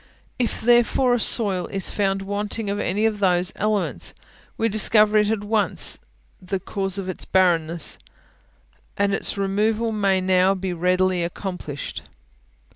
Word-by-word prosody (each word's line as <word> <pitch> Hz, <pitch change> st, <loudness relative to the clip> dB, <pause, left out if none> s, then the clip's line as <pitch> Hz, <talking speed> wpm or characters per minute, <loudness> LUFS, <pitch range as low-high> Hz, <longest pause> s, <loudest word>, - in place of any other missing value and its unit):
If 240 Hz, -, -1 dB
therefore 240 Hz, +2 st, +3 dB
a 245 Hz, -, +1 dB
soil 200 Hz, -5 st, +1 dB
is 195 Hz, -2 st, -1 dB
found 195 Hz, -1 st, 0 dB
wanting 205 Hz, +2 st, -3 dB
in 205 Hz, +1 st, -2 dB
any 205 Hz, +5 st, 0 dB
of 215 Hz, -2 st, 0 dB
those 180 Hz, -2 st, +2 dB
elements, 190 Hz, -, -1 dB, 0.4 s
we 225 Hz, -, +1 dB
discover 215 Hz, 0 st, +4 dB
at 210 Hz, 0 st, 0 dB
once 210 Hz, 0 st, 0 dB, 0.4 s
the 190 Hz, +1 st, -3 dB
cause 195 Hz, 0 st, -3 dB
of 195 Hz, -2 st, -4 dB
its 185 Hz, -, -5 dB
barrenness, 170 Hz, -3 st, +1 dB, 1.0 s
and 200 Hz, 0 st, +1 dB
its 195 Hz, -, -2 dB
removal 210 Hz, +3 st, 0 dB
may 200 Hz, -3 st, +1 dB
now 185 Hz, +1 st, +3 dB
be 185 Hz, -1 st, -3 dB
readily 180 Hz, +1 st, +1 dB
accomplished. 170 Hz, -, -5 dB
195 Hz, 135 wpm, -22 LUFS, 185-215 Hz, 1.0 s, discover